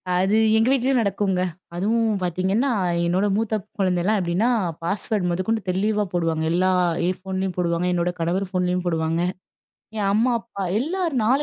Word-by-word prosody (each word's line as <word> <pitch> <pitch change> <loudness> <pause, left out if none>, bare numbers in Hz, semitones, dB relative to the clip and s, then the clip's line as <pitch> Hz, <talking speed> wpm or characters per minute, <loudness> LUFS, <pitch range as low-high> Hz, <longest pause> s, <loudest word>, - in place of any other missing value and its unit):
அது 190 +4 +2 0.2
எங்க 225 +2 +3
வீட்டிலேயும் 265 -1 +2
நடக்குங்க. 195 -2 0 0.3
அதுவும் 225 +5 +1
பார்த்தீங்கன்னா, 190 +9 0 0.3
என்னோட 185 +4 +1
மூத்த 220 -1 0 0.2
குழந்தலாம், 185 +3 +2
எப்படின்னா 180 +8 +1 0.3
பாஸ்வேர்ட் 200 +1 -1
மொதக்கொண்டு 185 +6 -1
தெளிவா 210 +3 +1
போடுவாங்க. 165 -2 0
எல்லா 185 +2 +2 0.4
என் 185 0 0
ஃபோன்லேயும் 190 0 -3
போடுவாங்க, 175 0 0
என்னோட 175 0 0
கணவர் 175 +4 0
ஃபோன்லேயும் 180 -1 0
போடுவாங்க. 165 0 0 0.8
என் 200 -2 0
அம்மா, 230 +4 +3
அப்பா 225 -4 -7 0.2
எல்லார் 340 +2 -1
4 265 +6 +3
190 Hz, 140 wpm, -23 LUFS, 180-220 Hz, 0.8 s, எங்க